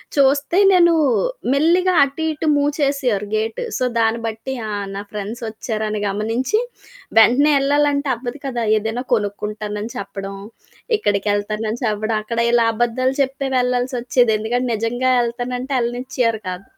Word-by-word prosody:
చూస్తే 280 +4 +3
నేను 345 -2 +5 0.6
మెల్లిగా 350 +6 +3
అటు 280 +3 -3
ఇటు 310 +1 -4
మూవ్ 285 0 +2
చేసేవారు 255 -8 0
గేటు. 220 - -2
సో 255 - -1 0.2
దాన్ని 225 0 +2
బట్టి 225 +4 -5 0.2
ఆ - - -3 0.2
నా 200 - -4
ఫ్రెండ్సొచ్చారని 215 0 -4
గమనించి, 225 - 0 0.6
వెంటనే 275 +7 +5
ఏళ్ళాలంటే 285 0 +1
అవ్వదు 245 +4 -7
కదా! 245 -3 -2 0.2
ఏదైనా 220 +4 -3
కొనుక్కుంటానని 210 +1 -4
చెప్పడం, 195 0 -6 0.6
ఇక్కడికేళ్తానని 210 +3 -1
చెప్పడం, 215 0 -1
అక్కడ 230 +2 -3
ఇలా 235 -1 +4
అబద్దాలు 250 +3 0
చెప్పే 270 +1 -3
వెళ్ళాల్సొచ్చేది 245 -1 +1
ఎందుకంటే 245 +3 -1
నిజంగా 245 +4 0
ఏళ్తానంటే 245 +3 -3
ఏళ్ళనిచ్చేవారు 240 -2 -1
కాదు. 180 +1 -6
240 Hz, 120 wpm, -20 LUFS, 215-270 Hz, 0.6 s, నేను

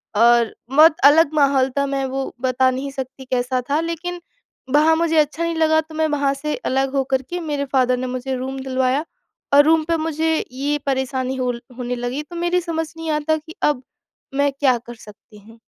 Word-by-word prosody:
और 235 +1 +4 0.2
बहुत 305 +4 +6
अलग 305 +2 +6
माहौल 275 -3 +3
था, 280 - +2
मैं 275 -1 -2
वो 265 +1 -4
बता 260 0 +2
नहीं 270 +2 -4
सकती 265 0 -7
कैसा 255 0 -1
था, 290 +2 +2
लेकिन 335 +2 -4 0.5
वहाँ 310 +2 +5
मुझे 325 0 +1
अच्छा 305 +2 +1
नहीं 335 0 -1
लगा 315 0 +3
तो 315 0 -13
मैं 315 0 +1
वहाँ 285 -2 +1
से 300 +2 -3
अलग 270 +1 0
होकर 265 -1 +1
के 355 - -3
मेरे 295 -4 -3
फादर 255 -1 +3
ने 255 +1 -3
मुझे 255 +1 -3
रूम 265 +1 -5
दिलवाया 260 +2 0 0.5
और 285 +1 +8
रूम 320 0 +4
पे 335 - +2
मुझे 320 0 0 0.2
ये 280 +3 -1
परेशानी 265 -1 -1
होल 250 -2 -2 0.2
होने 250 -1 -3
लगी, 245 +4 -3
तो 325 +3 -12
मेरी 345 +1 0
समझ 325 -2 -3
नहीं 325 0 -5
आता 305 +1 +1
कि 315 +2 -12
अब 290 -4 +1 0.5
मैं 285 +1 +2
क्या 260 -4 +3
कर 240 +1 -11
सकती 210 0 -16
हूँ? 225 +3 -17
275 Hz, 200 wpm, -20 LUFS, 255-315 Hz, 0.5 s, और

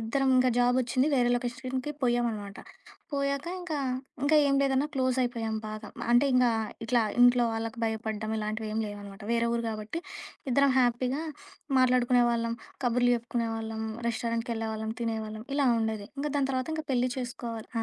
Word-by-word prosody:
ఇద్దరం 265 +5 0
ఇంక 255 0 +5
జాబ్ 245 +1 +4
ఒచ్చింది 255 +3 +1
వేరే 245 -2 +3
లొకేషన్‌కి 255 +3 -3
పోయ్యామనమాట. 235 -5 0 0.6
పోయాక 280 +1 -1
ఇంకా, 340 -4 -3 0.5
ఇంకా 305 +2 +4
ఏం 275 - +3
లేదన్నా 275 +1 +2
క్లోజ్ 260 -1 +1
అయిపోయాం 230 -3 -2
బాగా. 215 0 -6 0.2
అంటే 240 +3 +6
ఇంగా 250 -1 +5 0.4
ఇట్లా 235 +1 +3 0.2
ఇంట్లో 245 0 +6
వాళ్ళకి 225 +1 -4
భయపడ్డం 220 -1 -2
ఇలాంటివేం 215 0 -3
లేవనమాట. 205 -1 -8
వేరే 235 0 +2
ఊరు 235 0 0
గాబట్టి 215 +6 -4 0.5
ఇద్దరం 280 +2 +4
హ్యాపీగా 250 +3 +1 0.6
మాట్లాడుకునేవాళ్ళం, 245 -2 +3 0.3
కబుర్లు 245 0 +3
చెప్పుకునేవాళ్ళం. 225 -2 -3 0.2
రెస్టారెంట్‌కి 230 0 -1
ఎళ్ళేవాళ్ళం, 220 -1 -3
తినేవాళ్ళం 220 -1 -3
ఇలా 285 -1 +3
ఉండేది. 220 -2 -2
ఇంగ 290 - -1
దాని 270 -1 +1
తర్వాత 255 +2 -1
ఇంక 315 - -3
పెళ్లి 250 -1 +2
చేసుకోవాలి. 240 -3 -5
240 Hz, 140 wpm, -29 LUFS, 225-255 Hz, 0.6 s, అంటే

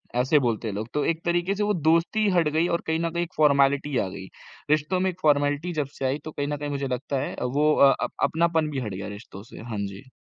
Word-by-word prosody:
ऐसे 130 +4 +3
बोलते 115 -3 -1
हैं 105 - -3
लोग। 110 +2 -4
तो 145 -1 0
एक 165 0 -1
तरीके 175 +2 +1
से 210 - -1
वो 210 0 +1
दोस्ती 170 +6 +2
हट 175 -4 +2
गई 165 +2 +2
और 170 - 0
कहीं 160 0 0
न 165 0 0
कहीं 170 +1 -1
एक 175 - -9
फॉर्मेलिटी 140 -1 +3
आ 95 - +1
गई। 95 0 -8 0.4
रिश्तों 155 +5 +1
में 190 0 +1
एक 180 0 -8
फॉर्मेलिटी 145 +3 +2
जब 150 -3 -1
से 135 - -3
आई 135 +3 0
तो 155 - -5
कहीं 145 -1 -3
न 145 0 -2
कहीं 145 0 -4
मुझे 140 -1 -2
लगता 130 +2 -2
है 140 - -4
वो 145 +5 +2
अ, 135 -1 +6 0.3
अपनापन 160 -1 +1
भी 135 - -2
हट 105 -6 -4
गया 95 +1 -5
रिश्तों 100 -2 -12
से। - - -10
हाँ 105 - -3
जी। 100 +7 -11
145 Hz, 260 wpm, -25 LUFS, 130-165 Hz, 0.4 s, अ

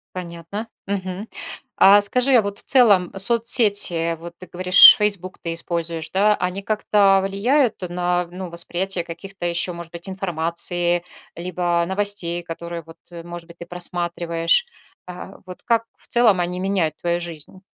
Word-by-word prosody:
Понятно. 175 +4 -7 0.2
Мгм. 195 +1 -4 0.5
А 205 +1 +7
скажи, 250 +6 0
а 235 - +6
вот 200 0 -4
в - - -2
целом 205 -9 +4
соцсети, 205 -6 +2
вот 170 +1 -9
ты 185 - -12
говоришь, 180 +1 +8
"Фейсбук" 200 -4 -1
ты 170 -1 -4
используешь, 165 -1 -4
да? 210 +2 +3
Они 180 +1 -3
как-то 200 -2 +2
влияют 230 +6 +1
на, 175 0 -1
ну, 185 0 -7
восприятие 175 +2 -3
каких-то 185 +2 -8
ещё, 170 +1 -1
может 170 -1 -10
быть, 170 +2 -6
информации 175 -1 -1 0.3
либо 175 0 -1
новостей, 190 -3 -2
которые, 170 0 -7
вот, 165 0 -16 0.3
может 175 0 -9
быть, 170 0 -16
ты 170 - -8
просматриваешь? 175 - -1 0.4
А, 180 +2 -10
вот 180 -1 -11
как 230 -1 +1
в - - -23
целом 230 -6 +3
они 180 +1 -2
меняют 185 -5 -1
твою 175 0 -1
жизнь? 170 +1 -9
180 Hz, 150 wpm, -21 LUFS, 170-200 Hz, 0.5 s, говоришь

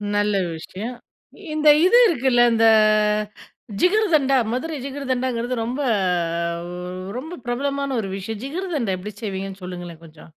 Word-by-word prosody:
நல்ல 205 0 +1 0.2
விஷயம். 205 +9 -7 0.6
இந்த 305 0 +4 0.2
இது 430 +6 +6
இருக்குல்ல, 255 - +2
இந்த 225 0 +3 1.2
ஜிகர்தண்டா 345 -9 +3 0.2
மதுரை 310 +4 -3
ஜிகர்தண்டாங்கிறது 255 -3 -2
ரொம்ப 250 +5 -3 1.4
ரொம்ப 315 +7 -7
பிரபலமான 275 +2 -1
ஒரு 195 - -5
விஷயம். 210 +3 -6
ஜிகர்தண்டா 295 - -2
எப்படி 210 +2 -7
செய்வீங்கன்னு 195 -1 -5
சொல்லுங்களேன் 175 -2 -8
கொஞ்சம்? 155 0 -15
250 Hz, 110 wpm, -22 LUFS, 200-285 Hz, 1.4 s, இது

